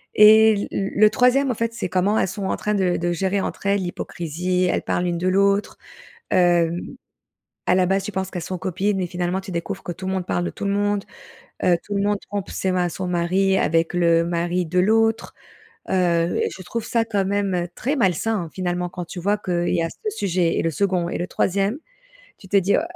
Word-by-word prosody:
et 220 +1 +8
l 205 - -2
l 195 0 -2
le 215 +1 +6
3e, 255 +2 +3
en - - -3
fait, 230 +1 -2
c'est 230 - -3
comment 195 +4 +1
elles - - +1
sont 195 - -3
en - - -1
train 210 - -1
de 185 -3 +1
de 175 0 -1
gérer, 190 +3 0
entre - - -5
elles, 200 -1 +2
l'hypocrisie, 180 +1 -2
elles - - 0
parlent 180 - -1
l'une 170 -1 -1
de 185 - -1
l'autre, 200 +2 +2 0.5
hem. 175 -1 +3 0.9
À 180 - +4
la 185 -1 +3
base, 195 0 +1
tu 210 - -5
penses 190 0 -3
qu'elles 180 - -4
sont - - -2
copines 190 +2 -1
et - - 0
finalement 175 +1 -2
tu 190 - -9
découvres 190 +3 -4
que 175 - -4
tout 185 +2 -7
le 190 - -1
monde 185 -2 -2
parle 175 - -1
de - - -1
tout - - -6
le 200 - +1
monde. 205 0 0 0.6
Heu, 175 -1 +4
tout 205 - -5
le 200 - +1
monde 205 -1 +1
trompe 205 -2 -4
ses 190 - -1
ma 180 -1 +1
son 185 +2 -5
mari 185 +2 +1
avec 165 +1 +1
le 170 -1 +3
mari 175 +1 -1
de 180 +3 0
l'autre, 225 +3 +2 0.6
heu 175 -2 +1
et - - 0
je 185 - -9
trouve 230 +5 -4
ça, 230 -1 +1
quand 200 -3 0
même, 200 -1 0
heu, 175 0 -1
très 275 +6 -1
malsain, 200 - +1
hein, 160 - -10
finalement, 180 -1 -2
quand 180 -2 -6
tu 180 - -8
vois 205 +3 +1
qu'il 175 -3 -1
y 170 - +1
a 165 - -1
ce 430 - -5
sujet 175 -3 +1
et - - +1
le 165 - 0
2nd 180 0 0
et - - -3
le 175 - -2
3e, 200 +7 0 0.6
tu 190 - -15
te 200 - +4
dis: 195 +1 +3
«Oh - - +1
190 Hz, 235 wpm, -22 LUFS, 175-205 Hz, 0.9 s, et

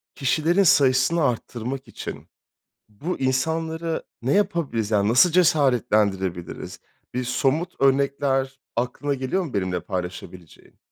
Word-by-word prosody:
kişilerin 155 +6 +2
sayısını 145 +1 +4
arttırmak 125 +1 -3
için - - -8 0.6
bu 145 - -5
insanlara 160 +5 -1 0.2
ne 130 +4 0
yapabiliriz? 150 - 0
Yani, 105 -1 +2
nasıl 130 +9 +5
cesaretlendirebiliriz? 110 - +1 0.3
Bir 125 0 -1
somut 135 +7 0
örnekler 135 -1 +1 0.2
aklına 125 +4 -1
geliyor 135 +9 -1
mu 145 - -8
benimle 95 -3 -1
paylaşabileceğin? 90 -2 -8
130 Hz, 105 wpm, -23 LUFS, 110-160 Hz, 0.6 s, nasıl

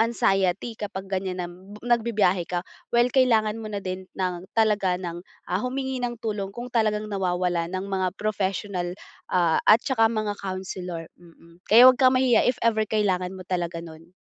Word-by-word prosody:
anxiety 195 -2 +1
kapag 200 -3 -6
ganyan 190 -1 -3
na 180 - -2
b 185 +4 -13
nagbibiyahe 220 -6 +2
ka, 175 0 -2 0.3
well 240 0 +4
kailangan 225 -5 +3
mo 215 - -6
na 205 - -3
din 185 -1 -6
ng 180 -2 -2
talaga 210 -5 +2
ng, 175 -1 -5 0.3
ah, 185 +3 -1
humingi 265 0 -3
ng 240 -1 -2
tulong 210 -4 -3
kung 240 +4 -8
talagang 215 -2 +1
nawawala 180 -3 0
ng 185 +1 -3
mga 190 -2 -1
professional, 190 -3 -2 0.3
ah, 170 -3 +2
at 215 - +8
tsaka 225 -5 +3
mga 215 -2 -1
counselor, 185 -3 -5
mm. 170 0 -19
Kaya 235 +4 +8
huwag 255 0 +6
kang 255 -1 +5
mahiya 255 -2 +4
if 250 - +1
ever 220 -2 +3
kailangan 190 -3 0
mo 185 - -9
talaga 175 -2 -2
nun. 165 +2 -13
195 Hz, 170 wpm, -25 LUFS, 180-225 Hz, 0.3 s, at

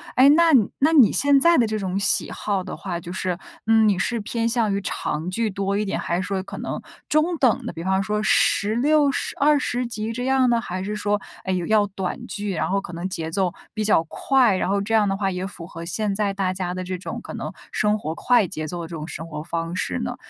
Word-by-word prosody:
哎， 260 +2 +7
那 330 +2 +5 0.3
那 305 +4 +4
你 260 -9 +7
现 280 0 +4
在 335 +3 +5
的 235 - +4
这 215 0 -2
种 190 0 -2
喜 200 - +2
好 200 -3 -2
的 185 - -6
话 175 -3 -5
就 175 +1 -8
是， 180 -2 -2 0.3
嗯， 220 -1 +5
你 200 -3 +2
是 235 +5 -1
偏 230 +2 -2
向 225 -4 +1
于 200 - -1
长 160 -2 -3
剧 225 +3 -1
多 195 +1 -1
一 210 - 0
点， 195 - -2
还 170 - -1
是 185 - -1
说 195 -1 -1
可 - - -9
能 - - -4 0.3
中 320 +3 +2
等 255 -6 +2
的， - - -3
比 165 - -7
方 190 +1 +1
说 210 0 -1
16、 275 +10 +3
十 - - -2
二 295 +1 +5
十 245 -1 -1
集 220 -1 -4
这 245 +2 -4
样 265 -1 +3
呢？ 235 -1 +3
还 185 -1 -4
是 210 +2 -3
说， 205 0 0 0.3
诶， 185 0 0
有 175 -2 -2
要 210 -1 +3
短 195 +5 -5
剧， 205 -1 -4
然 - - -1
后 195 +1 +1
可 175 - -9
能 175 +3 -3
节 165 -2 -4
奏 185 -1 0 0.2
比 215 - -2
较 165 -6 +4
快， 245 +4 +2
然 185 - -1
后 200 0 +1
这 220 +3 -3
样 210 -2 +4
的 195 - 0
话 195 -1 -1
也 185 +1 -3
符 175 -3 -9
合 165 -1 -8
现 200 +5 -1
在 200 -1 0
大 190 -2 -1
家 180 -1 -3
的 185 0 -4
这 185 0 -4
种 185 - -6
可 - - -8
能 - - -5 0.2
生 210 0 +1
活 160 -5 -4
快 240 -6 +3
节 155 -1 -5
奏 175 +1 -5
的 165 - -6
这 170 - -7
种 155 +2 -6
生 165 0 -7
活 150 -2 -6
方 165 0 -3
式 90 - -1
呢？ - - -3
200 Hz, 270 characters per minute, -23 LUFS, 180-230 Hz, 0.3 s, 哎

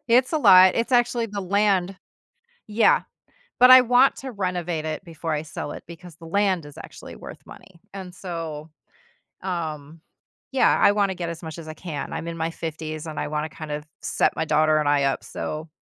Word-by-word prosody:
it's 250 +4 +3
a 315 - +2
lot, 185 -7 +7
it's 230 +3 -1
actually 240 -1 +2
the 205 -2 -5
land 195 -1 +1 0.7
Yeah, 215 +1 +3 0.6
but 250 - +8
I 255 0 +10
want 250 +2 +4
to 265 -1 -7
renovate 180 -5 -3
it 155 +4 -4
before 165 -2 -5
I 150 0 -2
sell 155 -2 -6
it, - - -9
because 170 -1 -12
the 165 - -14
land 185 -1 0
is 145 - -13
actually - - -11
worth - - -11
money, 185 -3 -15
and 190 -2 -8
so, 165 -4 -6 0.7
um, 160 -4 -5 0.5
yeah, 265 - +3
I 200 - +6
wanna 200 -2 0
get 175 -2 -5
as 170 +1 -7
much 160 0 -8
as 165 - -9
I 155 - -7
can, 155 -4 -6
I'm 165 - -5
in 170 - -5
my 165 0 -2
50s 155 -1 -6
and 155 - -6
I - - -2
wanna 150 +1 -3
kind 155 -1 -8
of 150 0 -4 0.2
set - - 0
my - - -1
daughter 155 0 +3
and 150 -1 0
I 145 -1 +2
up, 135 - -1
so 155 +1 -6
170 Hz, 200 wpm, -23 LUFS, 155-200 Hz, 0.7 s, I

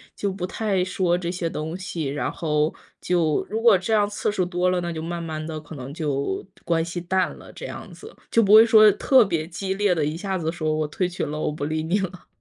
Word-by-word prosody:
就 200 -1 -2
不 185 -1 -4
太 200 -2 -1
说 180 -2 +1
这 175 -1 -4
些 175 -2 -2
东 160 +3 -4
西， 170 -4 -4
然 140 +2 -2
后 150 -1 0 0.3
就 165 -4 +1
如 220 +1 -2
果 225 -5 +6
这 205 +5 -2
样 205 -1 +4
次 205 0 -1
数 185 -3 0
多 180 0 0
了， 180 -1 +1
那 175 0 -3
就 160 -1 -4
慢 170 +1 -4
慢 155 -1 -5
地 155 -1 -5
可 155 +1 -11
能 135 +1 -7
就 140 - -2 0.2
关 165 -1 +1
系 175 +1 -5
淡 185 +1 +1
了， - - -13
这 - - -9
样 - - -8
子。 440 +2 -12 0.2
就 230 - +5
不 205 0 +4
会 220 +1 +10
说 215 -2 +7
特 255 +1 +5
别 165 -4 -1
激 190 +3 -3
烈 200 -2 +2
地， 155 -3 0
一 155 +2 -2
下 190 +1 -2
子 160 -2 -2
说 155 -2 -1
我 155 -1 -1
退 180 +4 -1
群 175 -4 -3
了， 150 - -4
我 155 - -1
不 145 -1 -4
理 155 +1 -2
你 180 +6 +1
了。 185 -1 -5
175 Hz, 270 characters per minute, -24 LUFS, 155-190 Hz, 0.3 s, 会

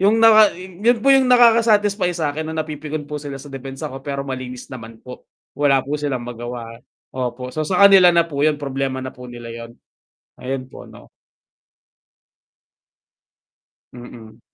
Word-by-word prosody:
Yung 205 +3 +3
naka 220 -4 +6
yun 190 +6 0
po 275 - +6
yung 265 -1 +4
nakaka 235 -2 +6
satisfy 205 -4 +2
sakin, 155 0 -3
na 160 - -5
napipikon 150 0 -6
po 150 0 -6
sila 140 -2 -7
sa 135 +1 -12
depensa 135 +2 -7
ko, 135 - -8
pero 140 0 -5
malinis 130 -1 -7
naman 115 -2 -9
po. 125 0 -12 0.2
Wala 140 -2 +2
po 145 +2 -3
silang 130 -5 -3
magawa, 120 -1 -8 0.3
opo, 125 0 -5
so, 155 - -4
sa 185 +5 +3
kanila 195 -3 +8
na 170 -1 +4
po 145 -4 -5
yun 150 0 +2
problema 135 -2 -4
na 130 - -6
po 125 0 -12
nila 120 -1 -9
yun. 115 0 -10 0.6
Ayun 130 0 -4
po, 130 - -13
'no. - - -15 2.9
Mhm. 115 -2 -13
140 Hz, 160 wpm, -20 LUFS, 125-175 Hz, 2.9 s, kanila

